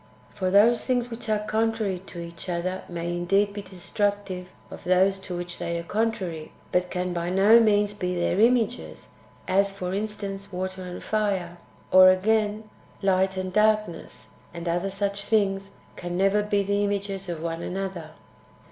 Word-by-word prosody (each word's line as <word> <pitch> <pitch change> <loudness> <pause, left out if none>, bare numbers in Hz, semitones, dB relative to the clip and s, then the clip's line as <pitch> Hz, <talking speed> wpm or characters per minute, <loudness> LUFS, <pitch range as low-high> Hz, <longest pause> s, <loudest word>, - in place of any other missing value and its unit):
For 185 -1 -1
those 215 +5 +5
things 245 -2 0
which 230 -1 -6
are 210 -1 0
contrary 220 -4 0
to 175 - -8
each 170 +1 -7
other 180 +2 -2
may 170 -1 -4
indeed 195 +4 +1
be 205 - -5
de 190 -1 -14
structive 200 0 -2 0.2
of - - -9
those 190 +2 +3
to 180 -2 -6
which 175 0 -5
they 170 0 -2
are 170 - -4
contrary, 185 -6 -2 0.2
but 180 0 +1
can 180 0 -2
by 170 0 -2
no 200 +5 +6
means 210 -2 +3
be 180 -3 -2
their 175 +2 0
images 240 +1 +1 0.2
— - - -28
as, 200 +1 +3
for 185 -2 -4
instance, 200 -1 -4
%vater 185 +1 -4
and 180 -1 -7
fire: 195 -5 -1 0.3
or, 185 0 +9
again, 210 +2 +1 0.4
light 190 0 +2
and 185 -1 -3
darkness, 215 -4 0 0.3
and 170 0 -6
other 175 +3 0
such 200 +1 -2
things, 195 -2 +1 0.3
can 175 0 -4
never 195 +2 +3
be 205 -1 +1
the 200 +1 0
images 200 -2 -2
of 165 -2 -4
one 165 0 -3
another. 185 -3 -4
195 Hz, 170 wpm, -26 LUFS, 180-205 Hz, 0.4 s, or